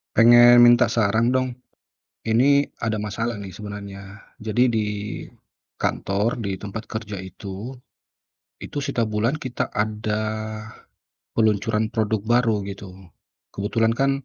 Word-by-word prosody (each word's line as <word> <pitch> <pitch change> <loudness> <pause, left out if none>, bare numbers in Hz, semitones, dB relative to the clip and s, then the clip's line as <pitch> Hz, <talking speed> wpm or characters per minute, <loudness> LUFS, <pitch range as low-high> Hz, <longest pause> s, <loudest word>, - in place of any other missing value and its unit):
Pengen 120 +1 +8
minta 120 0 +7
saran 115 +3 +1
dong. 130 -1 -1 0.6
Ini 140 +6 +3
ada 110 -2 -2
masalah 115 +3 -2
nih 100 - -7
sebenarnya. 100 0 -9 0.2
Jadi 110 +3 +1
di 110 -2 0 1.0
kantor, 100 +5 0
di 100 -5 -3
tempat 105 +3 -6
kerja 110 -2 -6
itu, 95 +5 -7 0.8
itu 145 - -7
setiap 140 -4 -1
bulan 110 +6 0
kita 130 -5 -3
ada, 105 0 -2 1.1
peluncuran 110 0 +1
produk 110 -1 +1
baru 115 -3 +2
gitu. 100 0 -8 0.6
Kebetulan 115 +3 0
kan 135 +2 0
110 Hz, 115 wpm, -23 LUFS, 105-120 Hz, 1.1 s, Pengen